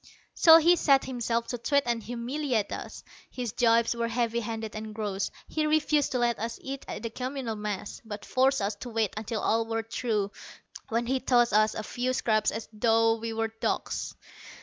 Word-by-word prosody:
So 325 -1 +8
he 335 +2 +5
set 275 -4 +4
himself 235 -2 -1
to 245 - -3
twit 280 +4 +2
and 235 -1 0
humiliate 240 0 -2
us. - - -7 0.3
His 245 -4 -4
jibes 230 0 +3
were 235 0 -1
heavy 235 0 0
handed 225 -1 -5
and 215 0 -6
gross. 205 -3 -2 0.2
He 310 -1 -1
refused 305 -1 +2
to - - +1
let 240 -2 +1
us 230 +2 -3
eat 270 0 -6
at - - -6
the 230 - -3
communal 255 -1 -4
mess, 210 -1 -5
but 210 -2 -7
forced 265 -2 +2
us 200 +2 0
to 245 - -7
wait 225 -3 0
until 215 0 -3
all 225 +1 +1
were 225 0 -1
through, 220 -3 -1 0.6
when 230 +1 0
he 260 +2 0
tossed 240 -3 +3
us 215 +1 +4
a 215 - -4
few 250 +3 -2
scraps 215 -4 +2
as 220 0 -5
though 225 +1 +3
we 230 0 -4
were 225 0 -1
dogs. 225 - -3
230 Hz, 195 wpm, -28 LUFS, 220-255 Hz, 0.6 s, So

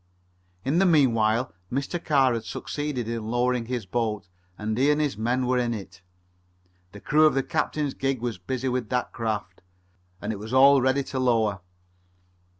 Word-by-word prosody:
In 145 +6 +2
the 195 - +4
meanwhile 120 -6 +3 0.2
Mr. 140 +7 -3
Carr 135 -5 +3
had 115 -1 -3
succeeded 145 -2 -4
in 115 -2 -4
lowering 120 0 0
his 125 -4 -3
boat, 105 -1 -2 0.3
and 110 0 -2
he 135 +5 +3
and 150 0 +3
his 150 -5 0
men 120 +4 0
were 125 0 +1
in 120 -1 0
it. 100 -1 -10 0.9
The 105 - -11
crew 155 +7 +4
of 145 - +1
the 135 - +1
captain's 145 +1 -1
gig 135 -1 -1
were 120 0 -2
busy 130 0 -2
with 125 -3 -2
that 125 -1 -1
craft, 105 -5 -4 0.6
and 105 +2 -3
it 100 - -7
was 110 +4 -7
all 135 +1 +7
ready 130 +2 +2
to 130 - -4
lower. 110 -6 +1
125 Hz, 175 wpm, -25 LUFS, 110-135 Hz, 0.9 s, all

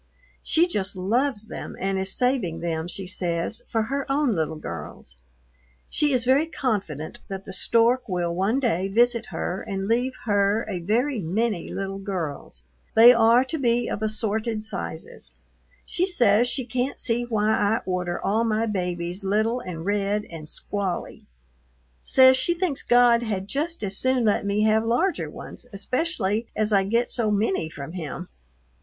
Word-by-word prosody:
She 330 +2 +3
just 200 - -3
loves 220 +5 0
them - - -7
and 195 0 -1
is 190 0 -1
saving 250 -10 0
them, 165 -1 -2
she 190 +2 -5
says, 175 +1 -1
for 225 -1 +1
her 275 +4 -3
own 280 -3 +2
little 160 -3 -1
girls. 80 - -8 0.8
She 295 -1 +2
is 250 -3 +2
very 275 +5 +3
confident 200 - -3
that 195 0 -6
the 190 - -7
stork 235 +5 +2
will 175 -2 -1
one 195 +9 +1
day 195 -8 0
visit 235 +3 +2
her 185 - -3
and 195 -2 -4
leave 245 +4 +1
her 205 +1 +2
a 190 -4 -3
"very 230 +9 0
many" 195 +2 -1
little 195 0 -4
girls. 165 - -5 0.3
They 235 +2 +9
are 230 +2 +5
to 305 +4 -3
be 240 -2 +1
of - - -3
assorted 215 0 -1
sizes. 80 - -7 0.5
She 365 +2 0
says 240 - +3
she 255 0 -2
can't 255 +2 -2
see 235 0 0
why 215 -2 +1
I 220 0 +2
order 180 -1 -2
all 215 +4 +1
my 225 0 +1
babies 180 -2 -3
little 215 +5 +1
and 175 -7 -7
red 205 +1 0
and 155 -2 -8
squally, 200 -1 -4 0.7
says 260 0 +6
she 345 +5 +1
thinks 340 -6 -1
God 240 -1 +5
had 200 -4 -3
just 305 +5 -3
as 195 -1 -2
soon 260 -2 +1
let 205 -1 +1
me 205 +1 +1
have 220 0 +3
larger 245 +12 0
ones, - - -10
especially 220 - -1
as 215 0 0
I 195 -1 +4
get 230 +4 +1
so 230 -3 +1
many 200 -6 0
from 145 -1 -8
him. 175 0 -6
215 Hz, 165 wpm, -24 LUFS, 190-245 Hz, 0.8 s, They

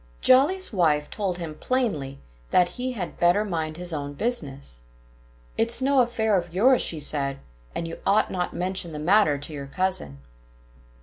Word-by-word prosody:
Jolly's 285 +7 +4
wife 150 -6 +1
told 195 -4 -2
him 165 -3 -6
plainly 155 - -2 0.3
that 180 -1 +3
he 255 +1 -4
had 190 -7 -6
better 175 +5 +3
mind 160 -5 -3
his 175 -1 -2
own 145 -1 -4
business. 140 - -3 0.8
"It's 230 +1 +4
no 270 +1 +2
affair 225 -3 +1
of 175 -2 -2
yours," 250 +6 +4
she 160 - -1
said. 140 -2 0 0.4
"And 165 - -3
you 165 - -8
ought 205 - +2
not 180 -1 -2
to - - -10
mention 180 -2 -2
the - - -5
matter 165 -1 +3
to 145 +2 -6
your 140 -2 -6
cousin." 160 - 0
175 Hz, 170 wpm, -25 LUFS, 150-220 Hz, 0.8 s, Jolly's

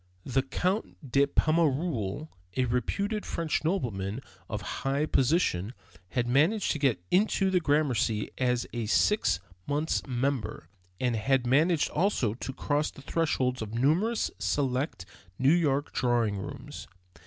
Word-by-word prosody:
The 135 +1 +1
Count 180 - -3
de 140 +2 +4
Pommereul, 155 - +1 0.3
a 130 - +3
reputed 200 - -1
French 165 -2 -2
nobleman 120 - -1 0.3
of 105 -2 -3 0.2
high 140 +2 +1
position, 130 - +1 0.3
had 120 +3 0
managed 160 - +3
to 150 - -2
get 130 -11 +1
into 195 0 +3
the 185 - +4
Gramercy 140 -9 +1
as 125 -1 +1
a 120 -2 -2
six 110 - +3 0.3
months' 150 +3 0
member, 125 - -2 0.3
and 125 -2 +1
had 125 +4 +1
managed 155 +6 +3
also 150 - +1
to 125 +3 -5
cross 145 +3 0
the 140 - -14
thresholds 130 -6 0
of 110 0 -5
numerous 170 - +2
select 130 - -1 0.3
New 135 +4 +4
York 145 -5 +1
drawing 120 -5 +1
rooms. - - -8
135 Hz, 130 wpm, -29 LUFS, 120-160 Hz, 0.3 s, de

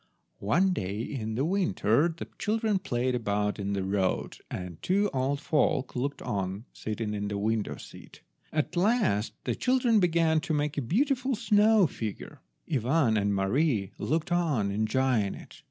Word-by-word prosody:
One 175 - +2
day, 100 - -3
in 110 -4 -4
the 135 +5 0
winter, 155 - +2
the 165 -1 -6
children 215 -2 +1
played 130 -8 -1
about 105 -3 -1
in 100 0 -2
the 100 -1 -1
road 95 -1 -1
and 90 -3 -6
the - - -35
two 200 +3 +2
old 135 +2 0
folk 145 -4 0
looked 140 +3 -2
on, 95 +2 -3
sitting 110 0 -4
in 105 0 -2
the 100 0 -3
window 110 +1 -1
seat. - - -13 0.3
At 155 +2 -1
last 185 - +2
the - - -1
children 250 -3 +2
began 165 -3 +3
to 155 0 -2
make 150 0 -1
a 145 - -1
beautiful 260 - +1
snow 215 -2 +4
figure. 110 -8 -6 0.3
Ivan 130 -3 +2
and 100 -1 +1
Mary 100 - +1
looked 160 +2 -1
on 150 -13 +1
enjoying 110 0 +1
it. - - -13
130 Hz, 160 wpm, -28 LUFS, 105-175 Hz, 0.3 s, snow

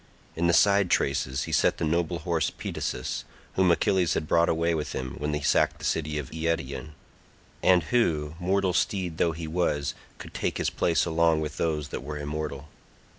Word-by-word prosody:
In 85 +1 +1
the 85 - +3
side 100 -1 +4
traces 65 -2 +1
he - - -6
set - - +3
the - - -1
noble 85 +2 0
horse 85 -2 0
Pedasus, 65 - -4 0.3
whom 95 -1 +3
Achilles 85 +1 +2
had 75 - -2
brought 85 +2 +3
away 85 +1 +1
with 75 -2 -3
him 65 -1 -4
when 75 +1 -1
he 75 - -3
sacked - - +2
the - - -7
city 75 -1 -1
of 75 -3 -5
Eetion, 80 -3 -3 0.7
and 90 -2 +5
who, 80 -8 +1
mortal 95 +1 +1
steed 95 -4 -1
though 85 - +2
he 80 +1 -6
was, 80 -3 0 0.2
could - - -10
take - - -2
his - - 0
place 80 -3 +1
along 85 -1 +2
with 75 0 -4
those 75 -3 -1
that - - -5
were 75 +2 -6
immortal. 75 -1 -4
80 Hz, 185 wpm, -27 LUFS, 75-85 Hz, 0.7 s, and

